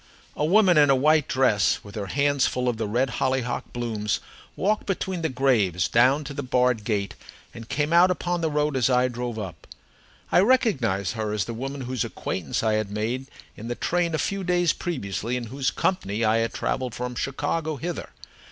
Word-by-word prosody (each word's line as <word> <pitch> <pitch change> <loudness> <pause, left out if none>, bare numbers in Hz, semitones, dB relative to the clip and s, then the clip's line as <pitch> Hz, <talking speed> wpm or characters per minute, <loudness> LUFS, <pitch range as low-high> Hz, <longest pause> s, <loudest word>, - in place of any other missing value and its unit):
A - - -1
woman 185 -1 +5
in 145 -1 +5
a 135 - +6
white 150 +2 +3
dress, 125 -6 +2
with 100 - -12
her 100 -2 -4
hands 140 +4 +2
full 125 0 -2
of 120 -2 0
the 110 -1 -2
red 120 +4 0
hollyhock 130 -2 -1
blooms, 110 -4 -2 0.4
walked 210 +3 0
between 190 -2 -2
the 160 - 0
graves 105 -10 +2
down 130 +8 +3
to 140 0 -7
the 140 - -4
barred 125 -3 +1
gate 105 -2 -1 0.4
and 115 0 -10
came 150 +2 0
out 175 +2 +6
upon 175 -1 -1
the 160 - +1
road 150 -1 0
as 130 -1 +2
I 125 0 +3
drove 120 -1 -4
up. 95 -7 -7 0.6
I - - +5
recognized 135 - +2
her 110 -2 -3
as 105 - 0
the 115 - -5
woman 135 +4 -5
whose 125 -2 -2
acquaintance 85 0 -3
I 110 -1 +2
had 110 -1 0
made 115 +6 -3 0.3
in 110 - -8
the 120 - -3
train 170 +2 0
a - - 0
few 195 +6 -2
days 175 -2 +2
previously, 125 - -3
and 120 - -4
in 110 - -11
whose 135 0 0
company 115 - -1
I 110 +1 +3
had 115 0 0
travelled 130 -2 -2
from 125 0 -4
Chicago 145 +5 -2
hither. 170 +6 -5
130 Hz, 200 wpm, -25 LUFS, 110-150 Hz, 0.6 s, a